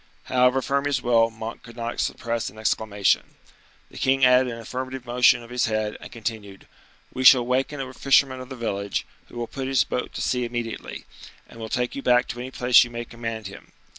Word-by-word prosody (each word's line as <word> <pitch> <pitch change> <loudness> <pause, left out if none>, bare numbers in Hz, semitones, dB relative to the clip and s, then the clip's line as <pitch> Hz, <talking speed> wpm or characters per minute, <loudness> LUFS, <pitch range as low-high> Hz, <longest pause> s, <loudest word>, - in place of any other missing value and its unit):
However 125 +1 +2
firm 140 0 0
his 140 -3 0
will, 115 -1 +4
Monk 110 0 -7
could 115 -1 -13
not 120 0 -4
suppress 115 -1 -2
an 110 - -17
exclamation. 105 -2 0 0.6
The - - -10
king 135 0 +3
added 125 0 +4
an 115 - -7
affirmative 130 +2 -6
motion 120 0 +4
of 115 - -13
his 125 -1 +1
head, 110 -1 -1
and - - -10
continued: 110 -4 -6 0.5
"We 130 - -3
shall 125 -1 +8
waken 130 +3 -1
a 130 -1 -5
fisherman 135 0 +3
of 130 - -10
the 130 - -7
village, 100 -4 -3 0.2
who - - -12
will 120 - -2
put 130 +3 -6
his 135 -1 +3
boat 125 - -4
to - - -5
sea 125 -1 0
immediately, 120 -1 -5 0.4
and 115 - -14
will 110 -1 -6
take 125 +1 -1
you 140 - -5
back 125 -1 +3
to 120 - -5
any 125 +1 -5
place 125 -1 +5
you 120 - -7
may 120 0 -6
command 115 -2 -6
him. 100 0 -11
120 Hz, 210 wpm, -24 LUFS, 115-130 Hz, 0.6 s, shall